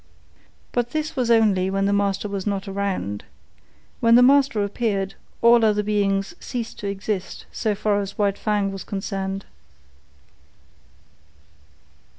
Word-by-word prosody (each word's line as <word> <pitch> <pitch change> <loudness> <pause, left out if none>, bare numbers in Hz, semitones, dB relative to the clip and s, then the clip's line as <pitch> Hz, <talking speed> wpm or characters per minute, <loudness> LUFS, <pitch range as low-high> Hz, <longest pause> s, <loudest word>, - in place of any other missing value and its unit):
But 240 0 -1
this 310 0 -2
was 250 -3 0
only 210 -5 +4
when 195 0 0
the 200 - +2
master 200 0 0
was 200 -1 -4
not 200 -1 -2
around. 195 - -3 0.8
When 230 0 +5
the 245 - +7
master 270 -5 +4
appeared, 200 -2 -1 0.3
all 235 0 +6
other 210 -1 +3
beings 200 +1 0
ceased 235 -3 -5
to 205 - -4
exist 200 -1 -4
so 215 -3 -1
far 205 0 +1
as 195 0 -6
White 200 -2 +1
Fang 205 -2 0
was 195 -1 -6
concerned. 195 -1 -4
205 Hz, 135 wpm, -23 LUFS, 195-225 Hz, 0.8 s, the